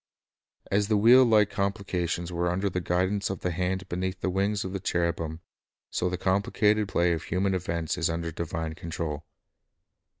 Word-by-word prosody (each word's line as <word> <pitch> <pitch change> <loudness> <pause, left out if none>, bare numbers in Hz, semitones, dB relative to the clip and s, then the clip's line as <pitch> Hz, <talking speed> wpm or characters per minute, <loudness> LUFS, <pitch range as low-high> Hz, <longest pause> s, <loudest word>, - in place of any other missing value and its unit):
As 100 +1 +2
the 105 -1 +3
wheel 120 +5 +7
like 105 -4 +4
complications 95 -4 -2
were 85 +1 0
under 95 +3 0
the 90 - -2
guidance 95 +3 0
of 95 - -4
the 90 - -1
hand 95 +2 -2
beneath 95 +1 -3
the 95 - -1
wings 100 +2 0
of 95 - -5
the 95 - -2
cheru 85 -2 0
bim, 80 0 -5 0.5
so 90 - 0
the 90 - -2
complicated 105 +3 +2
play 85 -2 +2
of 80 -1 -4
human 95 +2 0
events 85 -2 -2
is 85 - +1
under 85 0 -2
divine 80 0 -4
control. 80 -3 -5
90 Hz, 175 wpm, -27 LUFS, 85-100 Hz, 0.5 s, wheel